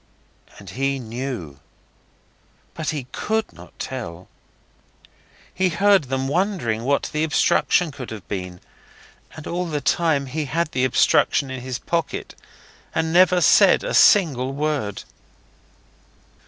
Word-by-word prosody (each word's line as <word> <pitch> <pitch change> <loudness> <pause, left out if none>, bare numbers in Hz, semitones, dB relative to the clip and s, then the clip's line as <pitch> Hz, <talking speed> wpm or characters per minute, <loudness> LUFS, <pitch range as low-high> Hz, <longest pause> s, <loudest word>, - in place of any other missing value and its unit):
And - - -11
he 135 +1 -1
KNEW, 115 - -6 1.1
but 155 - -4
he 145 -5 -3
COULD 220 0 -2
not 85 0 -15
tell. 90 -10 -7 1.2
He 185 0 +1
heard 195 0 +3
them 135 +1 -2
wondering 150 - -1
what 140 +1 0
the 155 +1 0
obstruction 160 +1 +2
could 130 -3 -8
have 105 -5 -9
been, 90 -2 -6 0.7
and 155 - -10
all 175 +1 -3
the 150 -3 -2
time 150 0 +1
he 150 +3 -4
had 165 +3 -2
the 130 -4 +1
obstruction 130 +2 +2
in 130 -1 -5
his 130 0 -4
pocket, 165 +1 -3 0.6
and 160 0 0
never 180 0 +5
said - - +5
a - - -3
single 135 - +4
word. 145 -8 -2
140 Hz, 125 wpm, -22 LUFS, 125-170 Hz, 1.2 s, never